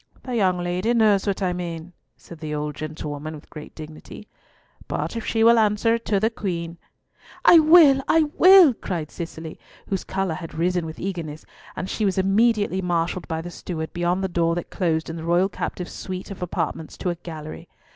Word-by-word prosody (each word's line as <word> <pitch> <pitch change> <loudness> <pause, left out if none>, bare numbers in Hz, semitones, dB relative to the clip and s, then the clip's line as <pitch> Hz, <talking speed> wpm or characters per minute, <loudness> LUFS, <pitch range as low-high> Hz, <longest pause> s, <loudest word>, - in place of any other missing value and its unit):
"The 250 -1 -4
young 185 -5 +2
lady 180 +6 -1
knows 210 -3 +3
what 200 0 -1
I 180 -1 +1
mean," 175 -1 -6 0.2
said 170 - -13
the 155 -1 -4
old 150 0 -3
gentlewoman 155 0 -6
with 150 - -14
great 150 -1 -10
dignity, 155 +6 -10 0.6
"but - - -3
if 230 - -4
she 225 -1 +1
will 230 0 +6
answer 215 +1 +2
it 230 0 -2
to 205 -2 +1
the 220 +3 +1
Queen—" 170 -6 -4 0.7
"I 340 - +9
will, 310 -4 +7
I 325 0 +4 0.2
will," 370 -6 +8
cried 170 -8 -5
Cicely, 165 -2 -7 0.3
whose 195 -2 -1
colour 190 -3 -2
had 165 0 -8
risen 175 0 0
with 160 - -8
eagerness, 165 -5 -5 0.3
and 190 - -4
she 215 - -3
was 195 -2 +1
immediately 205 0 +2
marshalled 175 0 -1
by 160 -1 -3
the 175 - -7
steward 160 -2 -6
beyond 175 +2 0
the - - +1
door 170 -2 0
that 175 - -5
closed 165 -4 -1
in 165 - -6
the 160 - -7
royal 175 +3 +2
captive's 180 -2 -5
suite 185 +2 -6
of 195 - -9
apartments 160 -2 -4
to 180 - -1
a - - -4
gallery. 155 -2 -9
180 Hz, 195 wpm, -23 LUFS, 165-205 Hz, 0.7 s, I